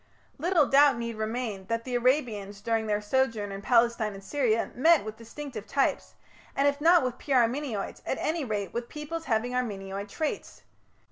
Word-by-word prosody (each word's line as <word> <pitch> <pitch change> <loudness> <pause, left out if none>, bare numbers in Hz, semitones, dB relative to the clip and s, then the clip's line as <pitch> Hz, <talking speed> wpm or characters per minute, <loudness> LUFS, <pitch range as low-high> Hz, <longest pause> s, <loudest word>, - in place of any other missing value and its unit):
Little 335 -1 +3
doubt 275 -1 +5
need 235 -1 -4
remain 215 -3 -3
that 230 +1 -1
the 255 - -6
Arabians 235 -6 0
during 225 +1 -1
their 210 0 0
sojourn 225 -3 0
in 195 0 -6
Palestine 230 -2 +2
and 195 - -11
Syria 230 -2 0
met 320 +3 +4
with 215 0 -6
distinctive 230 0 -8
types, 275 - 0 0.4
and 280 +1 +3
if 285 0 0
not 335 0 +6
with 250 -1 -3
pure 265 -4 +3
Armenoids, 235 -3 -3
at - - -2
any 320 0 -1
rate 210 -5 -3
with 235 0 -4
peoples 320 +2 -6
having 235 0 0
Armenoid 200 -5 -3
traits. 310 +8 -4
235 Hz, 175 wpm, -28 LUFS, 215-280 Hz, 0.4 s, not